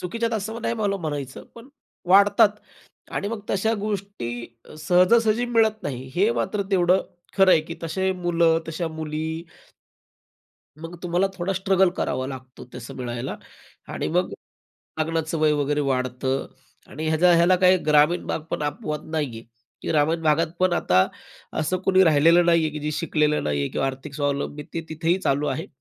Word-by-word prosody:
चुकीच्या 230 +6 -2
आहेत 230 - -1
असं 220 +3 -5
नाही 235 - -1
मला 205 -3 -1
म्हणायचं, 145 -7 -5
पण 235 +2 -13 0.4
वाढतात 200 +3 +6 0.7
आणि 200 - -2
मग 225 -1 -4
तशा 210 +3 +1
गोष्टी 195 - -4 0.3
सहजासहजी 215 +8 +3
मिळत 220 -2 +2
नाही 130 -2 -5
हे 200 +5 +3
मात्र 210 -3 -1
तेवढं 185 -1 +3 0.3
खरं 190 -1 +6
आहे, 160 - +6
की 165 +2 -8
तसे 190 +4 -1
मुलं 170 -2 +2
तशा 165 +1 -3
मुली 160 +1 -4 1.4
मग 165 +1 -8
तुम्हाला 175 +2 +1
थोडा 180 +2 -1
स्ट्रगल 190 -1 +2
करावा 130 +1 -2
लागतो 130 -1 -9
तसं 125 -2 -8
मिळायला 120 0 -4 0.6
आणि - - -3
मग - - +1 0.7
लग्नाचं 160 0 -1
वय 155 -1 +3
वगैरे 145 0 0
वाढतं 130 +1 -1 0.4
आणि 155 +3 -5
ह्याचा 165 +3 +4
ह्याला 175 +2 +4
काही 185 0 +5
ग्रामीण 150 +3 +3
भाग - - -2
पण - - -2
अपवाद 150 0 -4
नाही 155 -2 0
आहे - - -11 0.4
की - - -5
ग्रामीण 160 +2 +1
भागात 160 +1 +3
पण 185 -1 +3
आता 95 - +3 0.5
असं 155 +4 0
कोणी 190 0 +5
राहिलेलं 165 +2 +5
नाहीये 165 -2 +3
की 150 +1 -6
जे 150 +1 -2
शिकलेलं 150 -1 0
नाहीये 70 -1 -1
किंवा 135 - -1
आर्थिक 135 +2 -6
स्वावलंबन 145 0 -2
तिथेही 165 +2 -1
चालू 145 -5 0
आहे. 150 +5 -3
165 Hz, 160 wpm, -24 LUFS, 145-190 Hz, 1.4 s, वाढतात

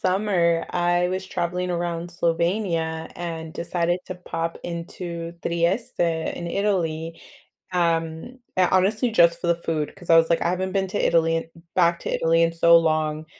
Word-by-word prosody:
summer, 185 -3 +2
I 175 0 +1
was 185 +1 -3
traveling 180 +1 -2
around 170 -1 -3
Slovenia 170 -1 -1
and 165 -2 -5
decided 175 +1 -1
to 185 - -5
pop 165 -2 -4
into 170 0 -6
Trieste 170 +8 -1
in 170 0 -1
Italy, 165 -4 -1 0.5
um, 165 +6 -1 0.2
uh, 185 -1 +4
honestly, 210 +6 +2
just 170 -6 +4
for 175 - -2
the 170 - +3
food, 160 -3 -3
'cause 175 -3 -8
I 165 - +8
was 165 0 +4
like, 165 - +2
"I 170 - +1
haven't 185 +1 -2
been 195 -1 +1
to 205 - -1
Italy 165 0 +3
in 165 0 -4 0.2
back 170 -2 +3
to - - -4
Italy 165 0 +3
in 165 - 0
so 170 0 +6
long," 155 -1 0
170 Hz, 165 wpm, -24 LUFS, 165-180 Hz, 0.5 s, I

